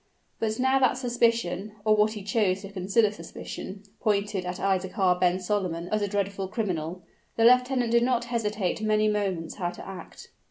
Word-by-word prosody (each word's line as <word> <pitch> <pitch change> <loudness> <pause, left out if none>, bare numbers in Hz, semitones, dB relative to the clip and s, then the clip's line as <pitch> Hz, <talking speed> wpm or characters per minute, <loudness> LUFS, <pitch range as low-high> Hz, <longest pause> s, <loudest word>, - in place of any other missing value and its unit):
But, 220 -1 -1
now 260 +1 +3
that 255 -1 +3
suspicion, 230 -5 0
or 215 0 +5
what 215 +1 +3
he 210 -3 -7
chose 195 -2 +1
to 195 - -8
consider 200 +3 +2
suspicion, 195 +2 -8 0.2
pointed 205 -3 0
at 180 - -3
Isaachar 190 -1 +1
ben 180 0 +2
Solomon 180 -3 -2
as 215 0 0
a 205 - +1
dreadful 200 -1 -2
criminal, 180 -4 -3 0.3
the 225 - +3
lieutenant 250 0 +4
did 235 0 +5
not 240 -1 +1
hesitate 215 -5 -1
many 215 0 +2
moments 195 -6 -1
how 175 -3 -1
to 175 - -10
act. 195 -1 -10
205 Hz, 170 wpm, -27 LUFS, 185-225 Hz, 0.3 s, or